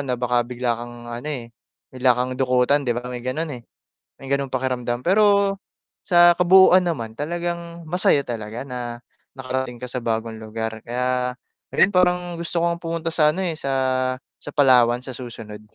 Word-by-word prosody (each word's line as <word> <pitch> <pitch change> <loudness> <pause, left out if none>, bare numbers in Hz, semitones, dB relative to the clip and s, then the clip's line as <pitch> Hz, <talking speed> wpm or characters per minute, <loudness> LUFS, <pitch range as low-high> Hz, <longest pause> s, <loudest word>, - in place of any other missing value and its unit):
na 125 -2 -1
baka 125 0 0
bigla 120 -1 -2
kang 120 0 -9
ano, 120 +5 -6
eh, 125 -6 -5 0.4
bigla 130 -1 +3
kang 125 +1 -2
dukutan 130 +2 +2
'di 120 - +1
ba? 125 0 -4
May 125 -1 -6
ganocn 155 +6 -2
eh, - - -23 0.6
may 135 - -11
gano'ng 140 -1 0
pakiramdam. 125 0 -2
Pero, 200 0 +4 0.5
sa 175 -1 +7
kabuuan 185 +1 +6
naman 125 -11 -3
talagang 170 +3 -4
masaya 155 -4 +2
talaga 115 +1 -5
na 120 -3 -6 0.4
nakarating 130 -1 -3
ka 125 - -6
sa 125 - -3
bagong 115 0 -2
lugar, 110 0 -5
kaya 125 +1 -1 0.4
ngayon 205 - +4
parang 180 0 +4 0.2
gusto 170 0 -3
kong 170 0 0
pumunta 165 -1 -3
sa 150 -2 +4
ano 185 +4 -3
eh, 165 - -2
sa 135 - -3 0.7
sa - - -7
Palawan 125 -4 +5
sa 130 - -6
susunod. 115 -4 -9
130 Hz, 170 wpm, -22 LUFS, 120-170 Hz, 0.7 s, sa